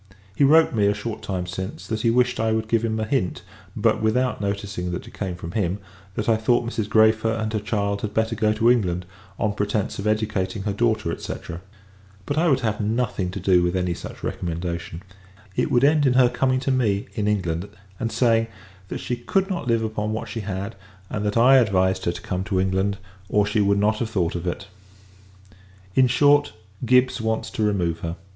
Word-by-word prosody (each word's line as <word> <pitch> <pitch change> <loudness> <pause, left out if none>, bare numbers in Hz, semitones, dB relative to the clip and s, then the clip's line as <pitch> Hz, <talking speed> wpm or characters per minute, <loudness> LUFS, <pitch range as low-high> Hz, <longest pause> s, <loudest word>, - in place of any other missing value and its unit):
He 140 - +2
wrote 155 +1 +5
me, 105 -3 +3
a 100 - +2
short 110 +1 -5
time 90 -2 -3
since, 95 +3 -6
that 110 -1 -3
he 115 - +2
wished 125 +1 +2
I 110 0 +1
would 110 0 -1
give 115 0 +1
him 110 -1 -1
a 110 - -1
hint 110 -6 -1 0.3
(but - - +2
without 125 +2 +1
noticing 100 -2 -3
that 90 - -5
it - - -13
came 95 -3 -4
from 85 -1 -7
him) 95 -2 -1 0.4
that 110 - -2
I 115 -1 +4
thought 120 +2 +1
Mrs. 110 -3 -2
Græfer 110 +1 +3
and 110 0 -2
her 110 - +1
child 100 -1 -1
had 105 - -3
better 110 +1 0
go 110 -1 +2
to 115 +2 +4
England; 90 -7 0 0.3
on 105 -2 0
pretence 105 0 -2
of 100 - -2
educating 105 -2 -1
her 100 - -1
daughter, 110 -5 0
&c. - - -4 0.9
But 145 - -2
I 170 +1 +3
would 135 -2 +2
have 110 -2 -1
nothing 110 -3 -1
to 90 - -5
do 90 -1 +4
with 90 +1 0
any 90 -1 0
such - - -9
recommendation. 85 0 -4 0.5
It - - +1
would 120 - +3
end 145 0 +4
in 125 - +3
her 125 -1 +5
coming 130 0 +1
to 135 - 0
me, 110 -6 +1
in 105 0 -1
England; 90 -3 -1 0.3
and 115 0 -2
saying, 115 -2 +2 0.4
that - - -4
she 125 - -3
could 190 +11 0
not 175 -8 -3
live 115 -1 +2
upon 110 -1 -2
what 110 - -4
she 115 - -5
had, 100 +1 -4 0.4
and 105 - -2
that 105 - 0
I 130 +3 +7
advised 95 -6 +2
her 85 - +2
to 90 - -8
come 95 -3 -2
to 95 -2 0
England, 95 +1 0 0.3
or 105 -1 +3
she 105 +2 0
should 100 0 +3
not 105 +2 +2
have 115 - -2
thought 90 -6 0
of 85 0 -4
it. 90 +2 -3 1.3
In 130 +3 +5
short, 145 +3 +4 0.3
Gibbs 125 0 +3
wants 110 0 -2
to - - -4
remove 90 -6 0
her. 85 0 -4
110 Hz, 210 wpm, -23 LUFS, 95-115 Hz, 1.3 s, I